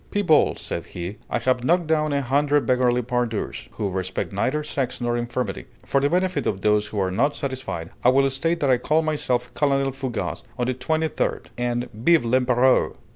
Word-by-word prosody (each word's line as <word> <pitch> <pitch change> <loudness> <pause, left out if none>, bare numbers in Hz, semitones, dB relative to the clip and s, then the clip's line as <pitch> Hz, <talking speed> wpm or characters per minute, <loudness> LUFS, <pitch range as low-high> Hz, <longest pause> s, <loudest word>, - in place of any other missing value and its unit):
"People," 175 -7 +3
said - - -5
he, 90 +5 -6
"I - - 0
have 130 -1 0
knocked 175 +5 +2
down 155 -1 +1
a 140 -1 0
hundred 145 +3 +2
beggarly 125 -1 +2
pandours, 120 -2 -2
who 105 - -2
respect 95 +1 -3
neither 135 +10 0
sex 130 -3 -2
nor 120 -1 0
infirmity. 120 -3 -3 0.2
For 140 - +1
the 140 - +2
benefit 185 +2 0
of 95 -2 -1
those 105 0 +2
who 105 - -4
are 95 -1 0
not 140 +10 +1
satisfied, 130 - -4
I 125 - +6
will 135 +1 +4
state 165 +6 0
that 140 -2 +3
I 125 - +3
call 155 +5 +2
myself 130 -6 -1
Colonel 140 -2 +1
Fougas 130 -3 -4 0.2
of 125 - 0
the 130 - 0
Twenty 155 +6 0
third. - - -3
And 120 0 -1
_Vive 130 +6 +3
l'Empéreur! 125 +1 +3
130 Hz, 190 wpm, -23 LUFS, 120-145 Hz, 0.2 s, I